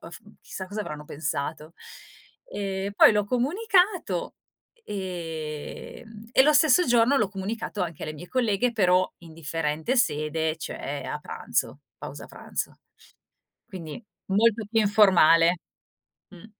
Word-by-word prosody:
Mhmm, 205 +5 -13
chissà 190 - -7
cosa 205 +3 -5
avranno 150 -6 -6
pensato." 150 +2 -4 0.8
Ehm, 195 0 -3
poi - - +8
l'ho 210 -1 +1
comunicato, 360 - +1 0.5
e 165 -4 -6
ehm, 220 -1 -13
e 265 - +6
lo 300 +1 +4
stesso 315 +4 +5
giorno 245 +3 +4
l'ho 210 -3 +1
comunicato 205 +1 -4
anche 170 -3 -5
alle 155 - -5
mie 165 +4 -10
colleghe, 240 -1 +1
però 185 -4 +3
in 165 -2 -14
differente 160 - -2
sede 155 -4 0
cioè - - -5
a - - -4
pranzo, - - -3 0.2
pausa - - -8
pranzo. - - -6 0.9
Quindi 180 +2 -8 0.3
molto 225 +2 +3
più 225 -1 +3
informale, 180 -5 +5 0.7
mh. 185 +2 -13
195 Hz, 125 wpm, -26 LUFS, 165-230 Hz, 0.9 s, poi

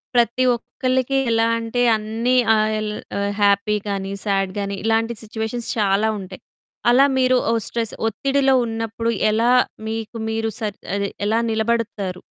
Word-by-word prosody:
ప్రతి 240 +2 +3
ఒక్కళ్ళకి 255 +2 -1
ఎలా 225 0 +3
అంటే 230 +1 -2
అన్నీ 225 +3 -1 0.2
ఆహ్, 215 0 +2
యెల్ 215 0 -2 0.5
హ్యాపీ 200 +1 +3
గాని, 195 -1 -3
సేడ్ 195 -2 +1
గాని 200 0 -3
ఇలాంటి 225 +1 +1
సిట్యుయేషన్స్ 220 +2 -4
చాలా 205 0 +2
ఉంటాయి. 185 -1 -9 0.5
అలా 255 +3 +6
మీరు 255 0 +4 0.3
స్ట్రెస్ 230 -2 -3
ఒత్తిడిలో 270 +4 +1
ఉన్నప్పుడు 225 0 -3 0.2
ఎలా 230 +3 +2 0.4
మీకు 225 +1 -4
మీరు 225 0 -1
సెట్ 210 -3 -4 0.2
అదే 200 0 -1 0.2
ఎలా 220 +2 +2
నిలబడతారు 220 -4 -1
225 Hz, 130 wpm, -21 LUFS, 210-235 Hz, 0.5 s, అలా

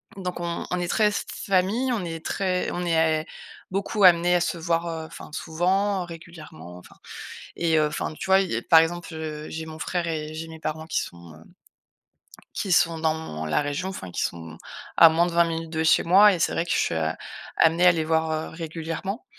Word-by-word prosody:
Donc 180 -2 -5
on 170 0 -3
on 180 - -1
est 175 - -2
très, 215 - +2
s 210 - -2
f - - -7
famille, 200 +7 +1
on 215 -7 -1
est 165 -1 -6
très 185 -2 -1
on 175 0 -3
est 160 -2 +2
a - - -12 0.5
beaucoup 200 +2 -1
amenés 175 -1 +6
à - - +4
se 175 0 -2
voir, 165 +1 0
heu, 165 -1 -4
enfin - - -11
souvent, 185 +4 0
régulièrement, 160 - -11
enfin 90 - -16 0.6
et 165 -2 +1
heu, 155 - +3
enfin, 150 +1 -4
tu - - -4
vois? 190 0 +5
Heu, 190 - -2
par 165 - +9
exemple, 170 +1 -1
heu, 155 -1 -6
j'ai 160 0 -5
mon 160 0 -9
frère 175 +2 -2
et 155 -2 -4
j'ai 160 +1 -6
mes 160 0 -10
parents 155 0 -4
qui - - 0
sont, 85 -2 -10
heu, 80 - -16 1.1
qui 190 - -1
sont 165 -2 +3
dans 160 - -2
la 80 - +1
région, 145 +5 -3
enfin, 95 - -7
qui - - -3
sont 80 -1 -4 0.4
à 165 - +10
moins 165 +2 +3
de - - -4
20 170 0 +4
minutes 165 -1 -4
de 160 0 -1
chez 160 - +4
moi 200 +4 +6
et 180 - -3
c'est - - +1
vrai 165 - -1
que - - -4
je - - +2
suis, - - 0
heu, 80 -1 0 0.5
amenée 165 +2 +4
à 180 - +7
les 160 -2 -1
voir, 160 0 +1
heu, 155 0 -3
régulièrement. 165 - -5
165 Hz, 225 wpm, -25 LUFS, 160-180 Hz, 1.1 s, à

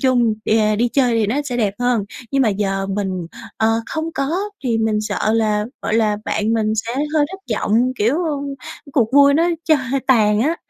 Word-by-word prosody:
chung 245 -4 +2
đà 215 -1 +2
đi 240 +3 +1
chơi 250 -1 +2
thì 215 - +1
nó 225 +7 -1
sẽ 250 -3 -3
đẹp 205 -4 0
hơn. 245 -4 +1 0.3
Nhưng 275 -1 +3
mà 225 - +3
giờ 195 -1 -1
mình, 190 -3 -3 0.3
ờ, 220 - +2 0.2
không 320 +1 -3
có 275 0 -2 0.3
thì 230 -3 +1
mình 220 -1 +1
sợ 215 0 -1
là, 215 -2 +1 0.2
gọi - - -1
là, 215 -2 +2
bạn 215 +1 -1
mình 220 -1 +1
sẽ 230 +2 -3 0.2
hơi 295 -2 +3
thất 385 - -8 0.2
vọng, 240 +4 +1
kiểu, 230 +8 +2 0.8
cuộc 240 -3 +1
vui 280 0 +6
nó 330 +3 +3 0.2
cho 315 - +4 0.3
tàn 215 -5 +3
á, 315 +7 +1
225 Hz, 195 wpm, -19 LUFS, 210-260 Hz, 0.8 s, vui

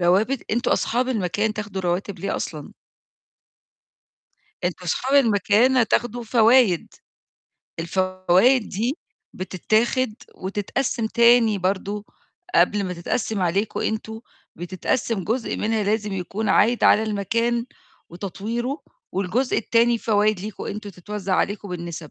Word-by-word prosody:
رواتب، 200 +9 +1
أنتم 235 +3 0
أصحاب 250 +2 +1
المكان 210 -2 0
تاخدوا 205 -3 -5
رواتب 180 +3 -2
ليه 195 - -2
أصلًا؟ 150 -4 -6 1.9
أنتم 180 0 -3
صحاب 260 +11 0
المكان 220 +4 +3
هتاخدوا 240 +1 +1
فوايد. 230 -4 +3 0.9
الفوايد 185 +7 +2
دي 235 - -2 0.4
بتتاخد، 215 +6 0 0.2
وتتقسّم 220 +5 -2
تاني 235 -2 +4
برضه، 195 +2 -2 0.5
قبل 205 -1 +3
ما 180 - -3
تتقسّم 200 +4 -2
عليكم 195 +5 0
أنتم، 220 0 -3 0.4
بتتقسّم 185 +4 -2
جزء 230 +5 -1
منها 220 0 0
لازم 210 0 -1
يكون 195 +4 -3
عايد 235 +3 +3
على 220 - +6
المكان، 230 +3 -1 0.4
وتطوّيره، 225 - -4 0.3
والجزء 200 +8 0
التاني 235 +1 +2
فوايد 215 -3 +1
ليكم 210 +1 -6
أنتم، 205 0 -6
تتوزّع 195 +1 -4
عليكم 205 +1 -1
بالنِسَب. 170 -2 -5
210 Hz, 110 wpm, -23 LUFS, 185-230 Hz, 1.9 s, على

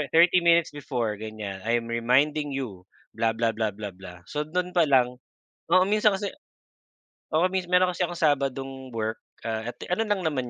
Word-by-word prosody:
30 175 +2 +6
minutes 170 -1 +4
before 125 -7 -2
ganyan, 110 -3 -6
I'm 115 0 +1
reminding 140 +5 +2
you 100 -9 -6 0.3
blah, 115 0 0
blah, 115 0 +1
blah, 110 0 -1
blah, 105 0 -6
blah, 90 -1 -12
so 150 0 -2
do'n 180 +2 -2
pa 170 - +6
lang 125 -2 +3 0.6
oo 185 0 +6
minsan 210 0 +3
kasi 200 +1 -3 1.0
oo 170 +3 +4
mins 185 -2 -1
meron 180 0 +4
kasi 180 +1 -1
akong 175 -1 -7
Sabadong 135 -2 0
work 110 0 -2 0.3
ah, 110 +1 -3
at - - -26 0.2
ano 220 +5 +2
lang 205 -2 +1
naman 130 -6 -1
135 Hz, 175 wpm, -26 LUFS, 115-170 Hz, 1.0 s, 30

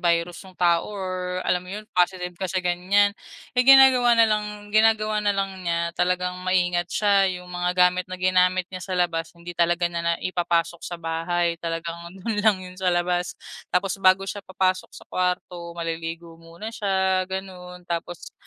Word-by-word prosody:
virus 170 0 0
yung 185 - -18
tao 170 0 +2
or 185 -2 -4
alam 180 - +1
mo 180 - -14
yun 210 +2 -6
positive 180 0 +1
ka 185 +1 -5
sa 185 0 -2
ganyan. 190 +3 +2 0.4
Ay 250 +1 +2
ginagawa 255 -3 +7
nalang 210 -2 +1
ginagawa 215 -1 +3
nalang 195 -2 -1
niya 170 -1 -1
talagang 180 +1 0
maingat 180 -1 +1
siya, 200 -2 +3 0.2
yung 180 - -12
mga 180 0 -1
gamit 180 0 +3
na 185 - -5
ginamit 185 0 +2
niya 185 - -6
sa 185 0 -4
labas 165 -2 0
hindi 170 +1 -9
talaga 175 +1 +1
niya 170 -1 -1
na 170 0 +1
ipapasok 170 -2 0
sa 175 - -6
bahay 170 +1 -1
talagang 170 0 -5 0.2
dun 215 -3 -1
lang 210 -2 +4
yun 185 -1 -10
sa 185 - +1
labas 175 0 0 0.3
tapos 195 +1 -1
bago 190 0 +4
siya 205 +1 -5
papasok 185 -1 -1
sa - - -12
kwarto, 180 -1 -3
maliligo 165 0 -5
muna 170 +7 -9
siya 190 -3 0
ganon 180 -2 -7
tapos 170 0 -5
180 Hz, 170 wpm, -24 LUFS, 175-195 Hz, 0.4 s, ginagawa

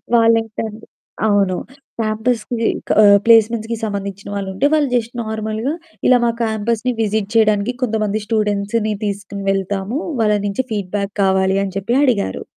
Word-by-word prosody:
వాళ్ళెంటంటే 225 -1 +1 0.4
అవును. 200 -3 +2 0.5
క్యాంపస్‌కి 225 +1 -1 0.2
క - - +2 0.3
ప్లేస్మెంట్స్‌కి 230 0 +4
సంబంధించిన 200 -1 -5
వాళ్ళుంటే, 195 +5 -2
వాళ్ళు 300 -2 +3
జస్ట్ 235 +1 -2
నార్మల్‌గా 220 +5 -3 0.3
ఇలా 250 -1 +6
మా 235 - +3
క్యాంపస్‌ని 225 +3 -1
విజిట్ 210 -1 -1
చేయడానికి 215 +1 +3
కొంతమంది 215 -2 -1
స్టూడెంట్స్‌ని 210 0 0
తీసుకొని 200 0 -5
వెళ్తాము, 195 - -2 0.2
వాళ్ళ 210 -1 +3
నుంచి 200 +6 -1
ఫీడ్‌బ్యాక్ 200 0 -3
కావాలి 190 0 +2
అని 195 -1 -5
చెప్పి 235 +6 -1
అడిగారు. 200 - 0
215 Hz, 125 wpm, -18 LUFS, 200-230 Hz, 0.5 s, ఇలా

